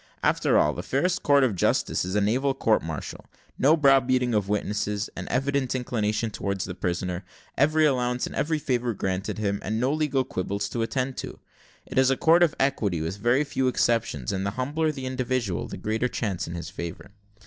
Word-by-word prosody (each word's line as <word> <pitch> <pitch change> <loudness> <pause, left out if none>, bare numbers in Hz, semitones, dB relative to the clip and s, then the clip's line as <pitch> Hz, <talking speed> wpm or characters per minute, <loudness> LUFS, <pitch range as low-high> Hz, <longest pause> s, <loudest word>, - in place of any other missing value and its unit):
After - - +3
all, 75 - +3
the 90 - -5
fairest 140 - 0
court 140 -1 +4
of 125 -5 +2
justice - - +1
is 95 +2 -3
a 105 - +3
naval 130 +7 +1
court 110 -5 +2
martial 80 -3 -6 0.3
no 150 +5 +5
brow 135 -3 +6
beating 125 -1 +1
of 105 -2 0
witnesses, 105 0 -1
an - - -6
evident 135 0 0
inclination 110 -3 -1
towards 100 -2 -3
the 90 - -5
prisoner 90 +1 -3 0.3
every 155 +3 +3
allowance 125 -3 +1
and - - -7
every 160 +1 0
favour 125 -5 -1
granted 95 +2 -2
him, 100 -2 -1
and 110 +2 -2
no 130 +4 +1
legal 150 -4 +1
quibbles 100 -4 -3
attended 125 +3 -1
to. - - -6 0.5
It - - -1
is 130 0 +5
a 135 - +2
court 165 +2 +5
of 170 -4 +4
equity, 110 -10 +1
with 80 +5 -3
very 120 +7 +2
few 135 -2 -1
exceptions; 115 - 0
and 95 0 -2
the 100 - 0
humbler 150 +5 0
the 135 -3 -7
individual, 130 -7 -2
the - - -7
greater 110 +3 -1
the - - -15
chance 100 -6 -2
in 85 - -5
his 85 - -6
favour. 85 +4 -7
120 Hz, 200 wpm, -26 LUFS, 100-135 Hz, 0.5 s, brow